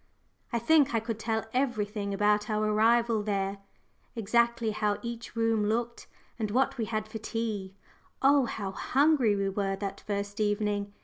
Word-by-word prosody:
I 235 - +1
think 280 +1 +3
I - - +3
could 225 0 -4
tell 220 0 -1
everything 210 -6 -1
about 210 +1 +2
our 215 0 +1
arrival 225 +1 +3
there, 200 -1 -2 0.6
exactly 235 +1 +1
how 210 -1 0
each 235 -1 -6
room 225 -2 +2
looked, 235 +2 -2 0.3
and 215 -2 -1
what 255 +3 +1
we 225 - 0
had 215 0 -3
for 220 +1 -7
tea 215 -4 -4 0.4
oh, 275 0 +5
how 205 -4 -4
hungry 270 +1 +2
we 195 -1 0
were 195 0 -1
that 195 0 -5
first 205 0 -4
evening! 205 -1 0
215 Hz, 160 wpm, -29 LUFS, 205-235 Hz, 0.6 s, oh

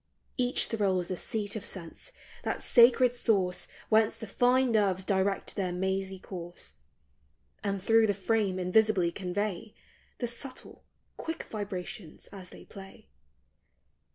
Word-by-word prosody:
Each 250 -1 +2
thrills 190 -5 0
the 185 - -1
seat 210 +3 0
of 215 - -4
sense, 180 - -6 0.3
that - - -3
sacred 245 0 +6
source 195 -7 +1 0.2
Whence 220 0 +3
the - - -6
fine 250 +4 +3
nerves 195 -4 +2
direct 195 0 0
their 190 -3 -1
mazy 190 +1 -2
course, 175 - -8 0.9
And 200 -1 -1
through 225 +1 +5
the 205 - +1
frame 200 -1 0
invisibly 185 -1 +3
convey 200 +3 -3 0.4
The 245 - -2
subtle, 255 +2 -8 0.3
quick 325 0 -4
vibrations 200 -3 -6
as 190 -3 -10
they - - -13
play. 195 - -13
200 Hz, 125 wpm, -30 LUFS, 185-225 Hz, 0.9 s, sacred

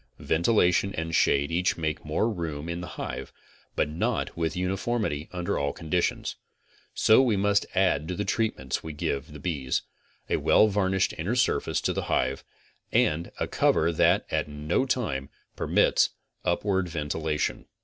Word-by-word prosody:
Ventilation 90 +2 +2
and 80 0 -3
shade 70 -1 +3
each 90 +2 +1
make 80 -2 -2
more 75 +8 0
room 85 -7 -4
in 85 +1 -3
the 90 - -6
hive, - - -5 0.4
but - - +1
not 75 +3 -2
with 85 +2 -2
uniformity 95 -4 -1
under 90 -1 -2
all 70 0 0
conditions: 85 +4 -1 0.6
So 110 +4 +6
we 120 -6 +2
must 100 +1 +2
add 90 -6 +2
to 90 - -3
the 105 - -2
treatments 85 - -1
we 80 - -7
give 70 -1 -3
the 75 - -9
bees, 70 -5 -1 0.4
a - - +1
well 110 - +5
varnished 95 -1 +1
inner 95 +10 -1
surface 125 - +1
to - - 0
the - - -3
hive, 65 +1 0 0.5
and 80 +3 +1
a - - 0
cover 85 +2 +2
that, 80 - +3
at - - 0
no 75 - -1
time, 70 - -1 0.3
permits - - +3 0.3
of 85 - +2
upward 95 -3 0
ventila 75 -1 -2
tion. - - -1
85 Hz, 160 wpm, -27 LUFS, 75-95 Hz, 0.6 s, So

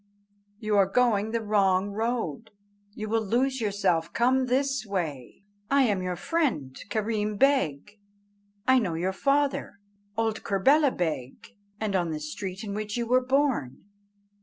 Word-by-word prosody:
you 215 -1 -1
are 195 -2 +5
going 215 -1 +2
the 230 0 -2
wrong 200 -2 +2
road, 225 - -2 0.5
you 215 - -5
will 225 +1 +1
lose 255 +5 0
yourself; 190 -6 0
come 255 +2 +2
this 270 +2 +1
way. 170 - -4 0.3
I 275 0 +4
am 205 -6 +1
your 180 -1 -2
friend 180 - -1
Kerreem 215 0 -1
Beg; 210 - +1 0.7
I 260 0 +6
know 185 -8 -2
your 180 +3 -1
father, 275 +1 0 0.4
old 225 -1 0
Kerbela 275 +10 +4
Beg, 160 - -4 0.3
and 215 -2 -2
the 170 -4 0
street 185 +6 -6
in 205 -2 -5
which 210 +1 -3
you 235 - -1
were 250 +2 +3
born." 265 - 0
210 Hz, 140 wpm, -27 LUFS, 185-250 Hz, 0.7 s, I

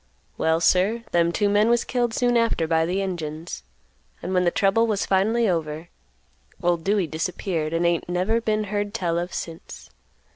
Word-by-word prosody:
Well, 160 0 +1
sir, 195 +7 +2
them 170 -1 +2
two 205 +4 +1
men 205 +2 +3
was 240 0 +3
killed 245 -2 -1
soon 245 -1 +2
after 230 -8 +2
by 160 0 +1
the 185 +3 -1
Injuns, 165 - -5 0.6
and 185 - -3
when 180 -1 +2
the - - +5
trouble 200 +6 +2
was 210 -3 0
finally 220 +5 +2
over, 160 -2 -2 0.7
old 175 -1 +1
Dewey 200 0 +1
disappeared, 160 0 -3
and 165 +1 0
ain't 170 0 0
never 185 +6 0
been 215 -1 0
heard 205 0 -3
tell 170 -2 0
of 175 +1 -4
since. 165 -1 -8
180 Hz, 175 wpm, -24 LUFS, 165-210 Hz, 0.7 s, the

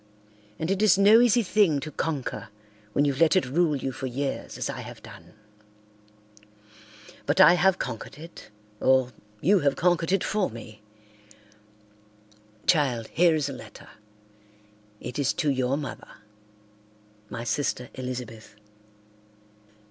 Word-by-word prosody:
And 160 +4 -2
it 195 +1 0
is 210 -4 +5
no 205 +3 +7
easy 245 -1 +4
thing 185 -7 +2
to 155 +2 -6
conquer 145 -9 -4 0.4
when 145 - +2
you've 140 +1 -1
let 165 +1 +5
it 185 - +3
rule 155 +4 +1
you 135 -1 -3
for 130 +1 -5
years 135 +2 -4
as - - -2
I - - -5
have - - -11
done. - - -14 1.9
But 145 +6 +1
I 185 -2 +9
have 180 +1 +3
conquered 125 +2 -6
it, 165 +2 -12 0.3
or 130 -1 +3 0.3
you 195 +6 +4
have 140 -3 +1
conquered 175 -1 +1
it 195 -1 +2
for 210 -2 0
me. 110 -2 -11 1.8
Child, 135 -10 +1
here 170 -1 +3
is 150 -3 -1
a 140 - -5
letter. 110 -4 -12 1.1
It 125 +3 -6
is 140 -2 +1
to 155 -5 0
your 130 0 0
mother—my 105 -3 -12
sister 125 +1 -2
Elizabeth. 125 -4 -7
140 Hz, 135 wpm, -26 LUFS, 120-175 Hz, 1.9 s, I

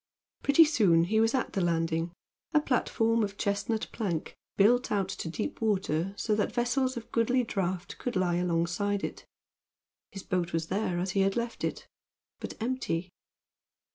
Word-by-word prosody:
Pretty 285 +4 +6
soon 195 - +4
he 215 +6 +1
was 225 +3 +3
at 255 - -1
the 195 - 0
landing 165 -1 0 0.4
a - - +8
platform 230 -4 +1
of 200 -1 -3
chestnut 215 +2 -1
plank, 180 -8 -3 0.2
built 240 +5 +4
out 200 -3 +1
to 175 - -4
deep 225 - -4
water, 195 -4 0
so 215 - 0
that 210 0 +1
vessels 255 +1 0
of 230 - -8
goodly 245 +2 +2
draught 190 -4 -3
could 245 - -3
lie 180 -2 +2
alongside 180 +3 0
it. - - -5 0.8
His 195 - -8
boat 180 -2 -1
was 165 0 -1
there 190 -2 0
as 180 +1 -1
he 195 - 0
had 195 0 +2
left 235 0 -3
it, - - -3 0.5
but - - -6
empty. 220 -8 -2
200 Hz, 165 wpm, -29 LUFS, 175-230 Hz, 0.8 s, a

